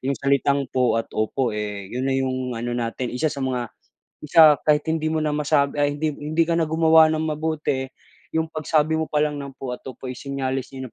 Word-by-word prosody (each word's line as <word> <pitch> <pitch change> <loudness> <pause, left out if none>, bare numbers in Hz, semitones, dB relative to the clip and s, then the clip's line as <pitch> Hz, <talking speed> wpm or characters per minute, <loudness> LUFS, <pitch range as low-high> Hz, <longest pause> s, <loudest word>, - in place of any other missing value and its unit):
yung 135 +1 -1
salitang 140 0 +1
po 125 -3 +2
at 115 - 0
opo, 115 +3 -1
eh, 105 -1 -4
'yon 130 +2 -2
na 135 - +1
yung 130 -2 -2
ano 120 +1 -3
natin, 120 +1 -3
isa 125 +6 0
sa 140 -2 -4
mga, 125 -2 -2 0.5
isa 155 0 +7
kahit 150 -1 +2
hindi 160 -1 0
mo 160 - 0
na 155 -1 0
masabi 145 -1 +1
ay, 145 0 +1
hindi 155 0 -1
hindi 155 +3 0
ka 170 - 0
na 165 -2 +1
gumawa 160 0 +5
ng 155 0 -1
mabuti, 150 -4 -2 0.5
yung 160 - +1
pagsabi 155 0 +1
mo 160 - -3
pa 150 - -1
lang 150 -1 0
ng 140 -1 -9
po 130 -2 -5
at - - -9
opo 130 0 -10
is 125 -1 -6
senyales 135 -1 -3
'yon 130 -1 -7
140 Hz, 220 wpm, -23 LUFS, 130-155 Hz, 0.5 s, isa